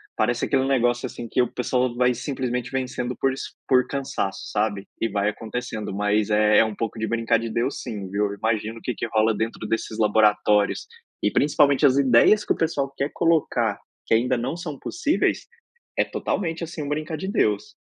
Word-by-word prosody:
parece 120 +2 +1
aquele 135 -2 +2
negócio, 120 -3 +1
assim, 120 - -6
que 125 - +1
o 125 - 0
pessoal 125 0 0
vai 125 0 +3
simplesmente 125 -1 -3
vencendo 125 -1 -2
por 135 -1 +2
es - - -6 0.3
por 125 -1 +4
cansaço, 135 -8 -3
sabe, 105 -2 -1
e 115 - +1
vai 100 0 0
acontecendo, 110 -2 -5
mas 105 +1 +1
é 105 +1 +5
um 110 -1 -2
pouco 115 0 -3
de 110 - -1
"brincar 115 0 +1
de 115 0 -4
Deus", 120 +5 -1
sim, 100 -4 -6
viu, 100 +1 0
imagino 110 +1 -2
o - - -21
que 125 - -2
que - - -3
rola 110 0 +3
dentro 110 +2 -3
desses 115 -1 -2
laboratórios 105 -1 +3 0.3
e - - +2
principalmente 145 -1 +3
as 135 -1 +5
ideias 140 - +5
que - - +2
o - - -8
pessoal 155 -4 -1
quer 140 +2 -1
colocar, 140 -10 +1 0.3
que - - +1
ainda 125 +2 +2
não 130 +7 -2
são 155 -5 -6
possíveis, 330 -2 0 0.5
é - - +4
totalmente, 165 -3 -3
assim, 160 -1 -6
um 140 - -5
"brincar 155 +2 -2
de 190 +5 -5
Deus". 105 - 0
120 Hz, 190 wpm, -24 LUFS, 110-135 Hz, 0.5 s, é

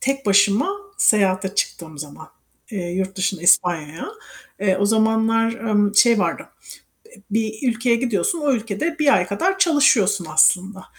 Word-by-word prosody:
tek 275 -2 -3
başıma 205 - +3 0.3
seyahate 190 -2 +1
çıktığım 160 -6 -4
zaman, 150 +1 -10 0.4
eee, 180 -5 -5
yurt 190 +1 -4
dışında 190 -2 -3
İspanya'ya. 170 -3 +1 0.5
Eee, 190 -2 +1
o 200 - +2
zamanlar, 225 +1 +1
emm, 210 -3 -1
şey 230 +2 +4
vardı. - - -2 0.7
Eee, 200 - -20
bir 220 0 -2
ülkeye 235 0 0
gidiyorsun, 235 - -2
o 290 -2 0
ülkede 230 +8 -3
1 290 -2 +3
ay 180 - +1
kadar 365 - -2
çalışıyorsun 230 - +2
aslında. 190 +4 +1
205 Hz, 140 wpm, -20 LUFS, 190-230 Hz, 0.7 s, şey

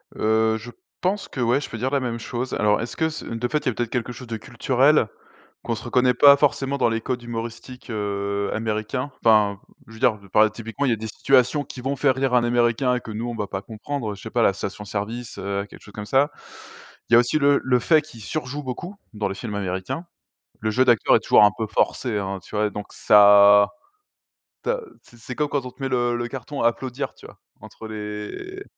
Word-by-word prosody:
Heu, 110 0 +2
je 120 +2 -10 0.3
pense 190 +3 -1
qu'ouais, 125 +1 0
je - - -7
peux 115 - -6
dire 130 +4 -2
la 140 - +2
même 120 -2 -3
chose. 120 +2 -4
Alors 105 0 +2
est-ce 120 - -6
que 160 -1 +1
ce 155 - -7
de 115 +1 -3
fait, 150 +4 0
il - - -16
y - - +5
a - - -2
peut-être 120 0 -2
quelque 125 -1 -2
chose 125 +1 -10
de 115 -1 -4
culturel 130 +4 +2 0.6
qu'on 115 - -2
se 110 - -8
reconnaît 125 +1 +2
pas 140 +3 +8
forcément 140 -1 +1
dans 125 - +3
les 115 0 -1
codes 125 0 -3
humoristiques, 120 +2 -7
heu, 100 -1 -2
américains. 110 +5 -2
Enfin, 105 -3 +4 0.3
je - - -13
veux - - -12
dire 120 -4 +3
par 110 0 +5
typiquement, 115 +5 -4
il - - +2
y - - +3
a - - +1
des 110 +1 -6
situations 135 +5 +2
qui 130 - -9
vont 135 +2 -1
faire 135 -1 +3
rire 130 0 -1
un 120 -1 +4
américain 120 +1 +2
que 115 - -10
nous 110 +3 -4
on 120 - -4
ne - - -8
va 105 - -2
pas 95 -1 -4
comprendre, 110 +1 -5
je 100 - -13
ne - - -14
sais 110 - -7
pas 120 - 0
la 100 - +4
station 100 +1 -6
service, 110 +4 -5
heu, 100 +1 -2
quelque - - -14
chose 105 - -14
comme 105 -1 -6
ça. 135 +6 +3 0.8
Il - - +6
y - - +9
a - - +9
aussi 120 +5 +1
le 140 -1 +4
le 125 -1 +2
fait 155 +5 +4
qu'il 130 -7 -14
surjoue 145 +4 -4
beaucoup 140 - -6 0.2
dans 105 -1 -1
les 95 - -4
films 105 +1 -6
américains. 95 - -4 0.6
Le 110 0 0
jeu 130 +4 +3
d'acteur 120 -3 +4
est - - +4
toujours - - +5
un 105 - +4
peu 110 - -2
forcé, 110 +2 0
hein, 95 -1 -4
tu - - -11
vois? 105 0 +1
Donc 105 0 -7
ça, 100 0 +7 1.0
tu - - -3
as - - -2 0.2
c'est 120 - -19
c'est 120 +2 -8
comme 150 +1 -1
quand 140 -3 -1
on 125 - -6
te 135 - -18
met 135 - -1
le 120 -2 +1
le 120 0 -3
carton 135 +3 -6
applaudir, 125 +3 -1
tu - - -16
vois? - - -16 0.2
Entre 110 - -10
les 105 - -6
120 Hz, 240 wpm, -23 LUFS, 105-130 Hz, 1.0 s, y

